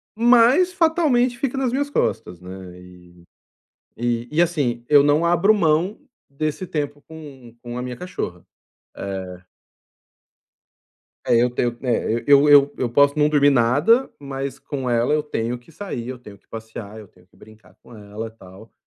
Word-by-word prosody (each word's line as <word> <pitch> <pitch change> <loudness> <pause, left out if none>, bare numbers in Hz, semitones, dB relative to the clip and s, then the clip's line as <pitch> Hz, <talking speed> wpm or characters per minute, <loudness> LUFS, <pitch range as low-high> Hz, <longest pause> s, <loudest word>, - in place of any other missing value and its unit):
mas 245 +10 +4
fatalmente 310 -9 +1
fica 270 0 -2
nas 260 -3 0
minhas 285 +3 -1
costas, 90 - -2
né, 90 0 -11
e 90 -1 -17 0.7
e 120 0 -2
e, 155 - 0
assim, 140 -9 -1
eu 145 -1 +6
não 145 +3 +2
abro 175 +5 +4
mão 175 0 +1 0.3
desse 155 +5 -3
tempo 145 -3 -4
com 135 -7 -12
com 120 0 -8
a 125 - -4
minha 125 0 -6
cachorra, 105 - -6 0.5
eh 95 -2 -7 1.8
É, - - +3
eu 120 +1 +3
tenho 120 -1 -2
né, 120 -2 -1
eu 145 +1 +6
eu 145 0 +6
eu 125 - -1
posso 145 +5 +3
não 150 0 +4
dormir 145 -1 +4
nada, 140 - +3
mas 140 -1 -6
com 135 -3 -5
ela 120 +2 +1
eu 150 0 +1
tenho 120 -5 -3
que 120 - -21
sair, 150 - -7
eu 130 -1 -6
tenho 105 -4 -14
que - - -41
passear, 110 -1 -9
eu 105 - -11
tenho 90 0 -25
que - - -29
brincar 110 0 -19
com 120 - -16
ela, 105 +1 -8
tal, 100 0 -16
135 Hz, 165 wpm, -21 LUFS, 115-160 Hz, 1.8 s, eu